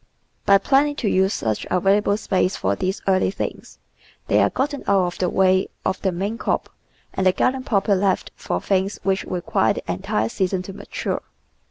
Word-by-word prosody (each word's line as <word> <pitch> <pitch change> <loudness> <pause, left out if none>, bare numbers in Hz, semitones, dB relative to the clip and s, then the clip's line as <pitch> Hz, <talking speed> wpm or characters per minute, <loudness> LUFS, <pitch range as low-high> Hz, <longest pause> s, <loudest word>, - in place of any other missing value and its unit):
By 200 - +7
planning 280 +7 +2
to 240 - -2
use 190 0 +3
such 110 - -2
available 200 +3 +2
space 190 -2 0
for 95 +1 0
these 185 - -3
early 190 -1 +3
things, 195 - -6 0.5
they - - +3
are - - +4
gotten 285 +1 -2
out 195 -2 +4
of 175 - -4
the 180 - +1
way 190 0 +3 0.2
of 190 - -1
the 190 - +1
main 200 +6 -3
crop - - -1 0.4
and 190 - +1
the - - +6
garden 255 +7 0
proper 205 -3 +1
left 195 -1 +1
for - - -3
things 195 +1 0
which 195 0 0
require 180 -2 0
the - - -6
entire 110 +1 -1
season 185 - -1
to 195 - -8
mature. - - -4
190 Hz, 185 wpm, -22 LUFS, 185-205 Hz, 0.5 s, By